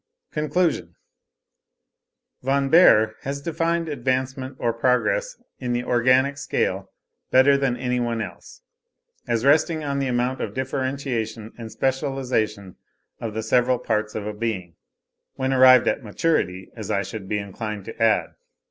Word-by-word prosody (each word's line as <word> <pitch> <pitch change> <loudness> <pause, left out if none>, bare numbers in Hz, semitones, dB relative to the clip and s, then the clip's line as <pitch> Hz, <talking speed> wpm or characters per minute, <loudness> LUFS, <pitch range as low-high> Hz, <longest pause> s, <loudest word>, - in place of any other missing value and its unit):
—CONCLUSION— 155 +3 -1 1.5
Von 135 +1 +1
Baer 110 -10 +6
has 140 +1 -4
defined 165 +2 -1
advancement 130 -1 -2
or 115 -1 0
progress 305 - 0 0.2
in 125 -2 -2
the 120 0 -1
organic 130 +4 +2
scale - - -1 0.4
better 130 +2 +5
than 135 -3 0
any 125 0 -1
one 120 -1 -1
else, 100 -5 -8 0.6
as 115 +1 0
resting 155 +2 +3
on 140 -1 -2
the 135 - 0
amount 125 +1 -1
of - - -4
differentiation 130 -4 -3
and 115 -2 -8
specialisation 125 -8 -2 0.4
of 110 -2 -5
the 110 - -2
several 125 +2 +2
parts 105 -2 -2
of 105 - -4
a 105 - -4
being,—when 110 +5 -6
arrived 130 -1 +7
at 140 - 0
maturity, 100 - -1
as 110 -4 -7
I 100 - +1
should 100 0 -7
be 105 - 0
inclined 105 0 -5
to 115 - -9
add. 115 -1 +3
125 Hz, 140 wpm, -23 LUFS, 110-140 Hz, 1.5 s, arrived